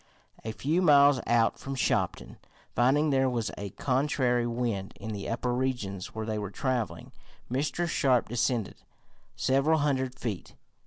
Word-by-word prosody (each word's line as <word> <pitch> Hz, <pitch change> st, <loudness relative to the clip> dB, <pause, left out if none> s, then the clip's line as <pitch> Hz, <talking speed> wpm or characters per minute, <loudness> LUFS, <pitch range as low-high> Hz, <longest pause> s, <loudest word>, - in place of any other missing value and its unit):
A 110 Hz, -, -3 dB
few 155 Hz, +10 st, 0 dB
miles 145 Hz, -4 st, +6 dB
out 115 Hz, -1 st, +2 dB
from 135 Hz, 0 st, -5 dB
Shopton, 130 Hz, -, -1 dB, 0.4 s
finding 140 Hz, +5 st, +3 dB
there 135 Hz, -1 st, +3 dB
was 120 Hz, -3 st, -2 dB
a 100 Hz, -1 st, -5 dB
contrary 125 Hz, 0 st, 0 dB
wind 115 Hz, -5 st, -2 dB
in 110 Hz, -, -5 dB
the 100 Hz, -1 st, -5 dB
upper 120 Hz, +1 st, -1 dB
regions 120 Hz, -8 st, -3 dB
where 110 Hz, 0 st, -3 dB
they 110 Hz, -1 st, -2 dB
were 100 Hz, -2 st, -4 dB
traveling, 125 Hz, +1 st, -3 dB, 0.4 s
Mr. 145 Hz, +6 st, -1 dB
Sharp 130 Hz, -6 st, +2 dB
descended 120 Hz, -2 st, -1 dB, 0.6 s
several 135 Hz, +4 st, +2 dB
hundred 130 Hz, -4 st, 0 dB
feet. 110 Hz, -8 st, -5 dB
125 Hz, 145 wpm, -28 LUFS, 115-135 Hz, 0.6 s, miles